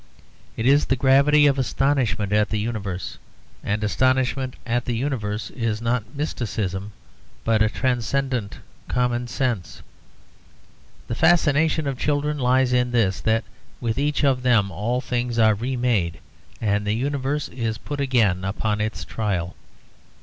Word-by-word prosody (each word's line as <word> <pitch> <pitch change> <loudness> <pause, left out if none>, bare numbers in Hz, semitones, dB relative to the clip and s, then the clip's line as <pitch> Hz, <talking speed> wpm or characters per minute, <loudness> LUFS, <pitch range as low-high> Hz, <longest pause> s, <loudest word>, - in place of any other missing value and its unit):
It 115 - -2
is 140 +3 +5
the 135 - +1
gravity 140 +3 +5
of 140 -1 +3
astonishment 125 -7 0
at 105 0 +3
the 110 - -1
universe, 105 -4 -4 0.4
and 105 +1 -1
astonishment 130 +3 +1
at 120 0 -1
the 120 - -1
universe 110 -6 -3
is 115 -3 -2
not 115 +1 -2
mysticism, 105 - -3 0.5
but 110 -1 +2
a 110 - +4
transcendent 125 -2 -1 0.3
common 125 -1 0
sense. 120 - -3 1.2
The - - -3
fascination 160 0 +3
of 135 -2 -3
children 150 0 0
lies 125 0 +3
in 125 0 +2
this: 110 -6 +1
that 110 0 +1 0.4
with 115 0 -1
each 150 +1 0
of 135 -3 +3
them 115 -6 +3
all 120 +6 -1
things 120 -2 -2
are 110 -1 +5
remade, 115 -7 0 0.4
and 105 -2 0
the 105 - +2
universe 140 +3 -1
is 115 -3 -3
put 145 +5 -5
again 110 -9 +2
upon 105 +2 -1
its 110 +1 -3
trial. 95 -6 -2
120 Hz, 140 wpm, -23 LUFS, 105-135 Hz, 1.2 s, is